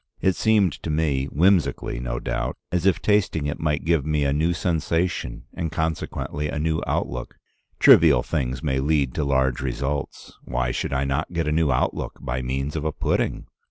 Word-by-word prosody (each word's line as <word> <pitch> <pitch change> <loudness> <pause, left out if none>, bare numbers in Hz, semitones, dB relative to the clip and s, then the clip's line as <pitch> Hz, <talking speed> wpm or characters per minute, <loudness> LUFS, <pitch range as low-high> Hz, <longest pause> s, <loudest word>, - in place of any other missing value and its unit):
It 95 - +2
seemed 105 -7 +3
to - - -5
me, 75 -4 +1
whimsically 90 -5 +1
no - - -3
doubt, - - -3
as 90 +1 +1
if 95 - +2
tasting 105 -7 +2
it 75 - -3
might 75 -2 -1
give 80 -4 +2
me 75 0 0
a 70 -1 +1
new 80 +4 +1
sensation, 85 -4 -1
and 80 -3 -3
consequently 80 -2 -3
a - - -3
new 80 +1 0
outlook. 60 0 -3 0.4
Trivial - - +6
things 65 +2 -2
may 65 -3 0
lead 70 -2 +1
to - - -1
large 65 -3 +1
results: 70 +2 -4
why 60 0 -1
should - - -3
I 65 0 0
not 70 +5 -2
get 85 -2 -1
a - - +1
new 80 -2 +2
outlook 65 - -1
by 65 +1 -3
means 65 +4 -3
of 75 - -2
a 80 - 0
pudding? - - -1
75 Hz, 185 wpm, -24 LUFS, 65-80 Hz, 0.4 s, Trivial